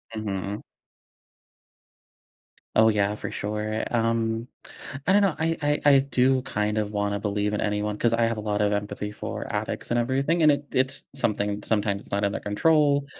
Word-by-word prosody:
Mhm. 100 Hz, -1 st, -4 dB, 2.1 s
Oh, 110 Hz, 0 st, +6 dB
yeah, 105 Hz, -1 st, +1 dB
for -, -, -5 dB
sure. 105 Hz, +1 st, -3 dB
Um, 115 Hz, 0 st, 0 dB, 0.6 s
I 190 Hz, -, +5 dB
don't 205 Hz, -, +5 dB
know. 195 Hz, -5 st, +2 dB
I 165 Hz, +1 st, +1 dB
I 145 Hz, 0 st, +1 dB
I 140 Hz, -2 st, +7 dB
do 130 Hz, -1 st, +2 dB
kind 105 Hz, -2 st, -2 dB
of 105 Hz, 0 st, -2 dB
wanna 105 Hz, -1 st, -1 dB
believe 105 Hz, +1 st, -1 dB
in -, -, -1 dB
anyone 105 Hz, 0 st, -1 dB
'cause 115 Hz, -1 st, +1 dB
I 115 Hz, -, +1 dB
have 115 Hz, -1 st, -1 dB
a -, -, -3 dB
lot 105 Hz, -1 st, -1 dB
of 105 Hz, 0 st, +2 dB
empathy 105 Hz, 0 st, -3 dB
for -, -, -5 dB
addicts -, -, -3 dB
and 120 Hz, -, +2 dB
everything, 135 Hz, +7 st, +1 dB
and 155 Hz, -1 st, +7 dB
it 145 Hz, 0 st, -1 dB
it's 130 Hz, +1 st, 0 dB
something 105 Hz, -5 st, -1 dB
sometimes 100 Hz, -2 st, 0 dB
it's -, -, -16 dB
not 100 Hz, +1 st, 0 dB
in 100 Hz, -, +2 dB
their -, -, -4 dB
control, 145 Hz, +5 st, +2 dB
110 Hz, 180 wpm, -25 LUFS, 105-130 Hz, 2.1 s, I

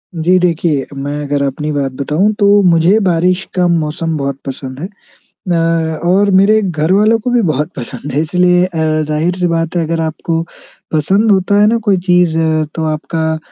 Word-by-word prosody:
जी 175 Hz, +3 st, +2 dB
देखिए, 165 Hz, -5 st, 0 dB
मैं 145 Hz, +2 st, -4 dB
अगर 145 Hz, 0 st, -1 dB
अपनी 150 Hz, +3 st, -3 dB
बात 140 Hz, -2 st, -2 dB
बताऊँ, 150 Hz, +10 st, 0 dB
तो 205 Hz, 0 st, +3 dB
मुझे 170 Hz, +5 st, +3 dB
बारिश 180 Hz, +2 st, +1 dB
का 180 Hz, -1 st, +2 dB
मौसम 165 Hz, -1 st, -1 dB
बहुत 140 Hz, -1 st, -3 dB
पसंद 130 Hz, -1 st, -7 dB
है। 175 Hz, -, -4 dB, 0.6 s
न 175 Hz, -, +2 dB, 0.5 s
और 200 Hz, +2 st, +3 dB
मेरे 210 Hz, +3 st, +4 dB
घर 160 Hz, -4 st, -1 dB
वालों 215 Hz, +4 st, +3 dB
को 250 Hz, +3 st, -3 dB
भी 245 Hz, -1 st, +2 dB
बहुत 150 Hz, 0 st, -1 dB
पसंद 130 Hz, +3 st, -7 dB
है 145 Hz, -, 0 dB
इसलिए 180 Hz, +2 st, +2 dB
अ, 175 Hz, -3 st, -7 dB, 0.3 s
ज़ाहिर-सी 175 Hz, +4 st, -1 dB
बात 165 Hz, 0 st, -2 dB
है, 170 Hz, -, +1 dB
अगर 165 Hz, +1 st, -2 dB
आपको 165 Hz, +1 st, -2 dB, 0.5 s
पसंद 195 Hz, +8 st, +2 dB
होता 200 Hz, +1 st, +2 dB
है 210 Hz, -, +5 dB
ना 230 Hz, +2 st, +2 dB
कोई 195 Hz, -2 st, +3 dB
चीज़, 175 Hz, -2 st, +3 dB, 0.4 s
तो 160 Hz, -, -3 dB
आपका 160 Hz, +1 st, -2 dB
165 Hz, 180 wpm, -14 LUFS, 150-185 Hz, 0.6 s, है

